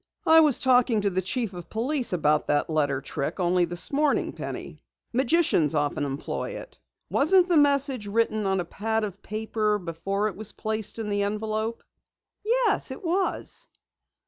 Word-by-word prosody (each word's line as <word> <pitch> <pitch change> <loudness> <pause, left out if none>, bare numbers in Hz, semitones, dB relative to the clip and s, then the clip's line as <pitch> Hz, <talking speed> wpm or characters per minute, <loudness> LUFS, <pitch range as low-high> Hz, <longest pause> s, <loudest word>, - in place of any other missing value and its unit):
"I 320 0 +7
was 300 -5 +5
talking 245 -4 +3
to 200 -1 0
the 185 +1 0
Chief 215 +2 -2
of 175 -2 -9
Police 255 +4 0
about 150 -4 +1
that 145 +2 0
letter 145 -3 0
trick 140 +5 -4
only 180 0 +2
this 175 +1 -1
morning, 290 0 +1
Penny. - - -7 0.3
Magicians 255 - +2
often 145 -1 0
employ 140 +1 -4
it. - - -13 0.3
Wasn't 360 +5 +4
the 350 -3 +3
message 280 -6 +3
written 215 -1 0
on 190 0 +1
a 175 - -2
pad 220 +5 -2
of 200 -2 -5
paper 215 0 -1
before 195 +3 -2
it 210 - -5
was 215 0 -4
placed 215 -1 -3
in 220 -2 -4
the 205 0 0
envelope?" 215 +2 -2 0.6
"Yes, 485 +3 +1
it - - -8
was." 370 +3 -2
215 Hz, 165 wpm, -26 LUFS, 180-260 Hz, 0.6 s, I